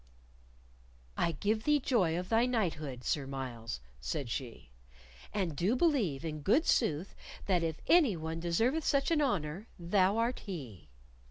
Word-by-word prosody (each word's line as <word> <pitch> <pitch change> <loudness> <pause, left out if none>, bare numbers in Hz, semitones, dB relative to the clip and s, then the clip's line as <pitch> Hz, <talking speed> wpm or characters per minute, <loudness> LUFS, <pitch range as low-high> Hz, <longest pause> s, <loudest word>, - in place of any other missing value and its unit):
"I 170 - +1
give 215 +8 0
thee 295 -1 +3
joy 195 - +1
of 180 +1 -4
thy 230 +2 +3
knighthood, 155 - -2
Sir 140 0 -1
Myles," 120 - -5 0.2
said 65 - -3
she, 115 - -6 0.6
"and 185 -7 -1
do 190 - +1
believe, 235 - +1
in 155 -2 -4
good 235 - +3
sooth, 175 - +1 0.3
that 180 -3 +2
if 165 -1 -2
any 300 - +5
one 160 +1 -4
deserveth 225 - +1
such 280 +3 +1
an 315 -2 +3
honor, 195 - -1
thou 185 +3 +2
art 235 +2 0
he." 135 - -8
175 Hz, 150 wpm, -32 LUFS, 150-230 Hz, 0.6 s, any